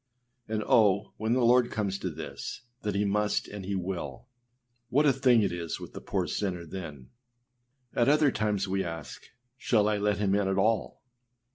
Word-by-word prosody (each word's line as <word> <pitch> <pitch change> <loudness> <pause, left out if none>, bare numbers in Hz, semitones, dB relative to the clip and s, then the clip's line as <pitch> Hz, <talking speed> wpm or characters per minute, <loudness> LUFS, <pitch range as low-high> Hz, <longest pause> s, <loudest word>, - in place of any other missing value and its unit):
â 110 - -1
And 105 - -1
oh! 100 -3 +3
when 110 +2 0
the 125 -1 +3
Lord 125 0 +5
comes 100 -3 -2
to 90 - -2
this, 75 +1 -7 0.2
that 105 -2 -2
he 100 +1 +1
must 105 +1 0
and 100 -1 -7
he 100 +1 -3
will, 90 - -4 0.6
what 145 +5 +3
a 140 - +5
thing 125 -4 +4
it 100 - +1
is 85 -2 -4
with - - -9
the - - -8
poor - - -1
sinner 90 -4 -3
then! 75 -7 -8 0.8
At 120 +2 +3
other 150 -1 +4
times 105 -3 0
we 95 0 0
ask, 80 -3 -7 0.3
âShall 105 -4 +2
I 105 -1 +1
let 105 0 +1
him 100 -2 +1
in 100 -1 +2
at 95 0 0
all? 110 +3 0
100 Hz, 190 wpm, -29 LUFS, 95-110 Hz, 0.8 s, Lord